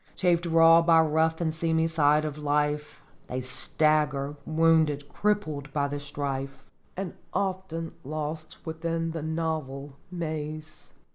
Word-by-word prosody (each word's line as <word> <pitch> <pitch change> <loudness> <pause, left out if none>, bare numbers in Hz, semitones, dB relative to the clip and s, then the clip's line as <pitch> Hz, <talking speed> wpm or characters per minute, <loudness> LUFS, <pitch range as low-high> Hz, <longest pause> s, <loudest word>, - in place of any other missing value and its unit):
Chafed 175 -2 +2
raw 165 0 +7
by 165 -1 +5
rough 160 +1 +1
and 160 -2 0
seamy 160 0 +1
side 155 -1 +3
of 150 -2 -3
life, 150 0 -1 0.2
They 125 - -3
stagger, 145 +2 +1
wounded, 160 -3 +3
crippled, 155 -7 -1
by 145 -1 +1
the 145 0 -3
strife, 140 -1 -4 0.3
And 190 -1 -4 0.2
often 185 -4 -2
lost 155 +3 -5
within 165 0 -2
the 165 -1 -4
novel 155 -3 -3
maze. 155 -2 -5
155 Hz, 125 wpm, -27 LUFS, 145-165 Hz, 0.3 s, raw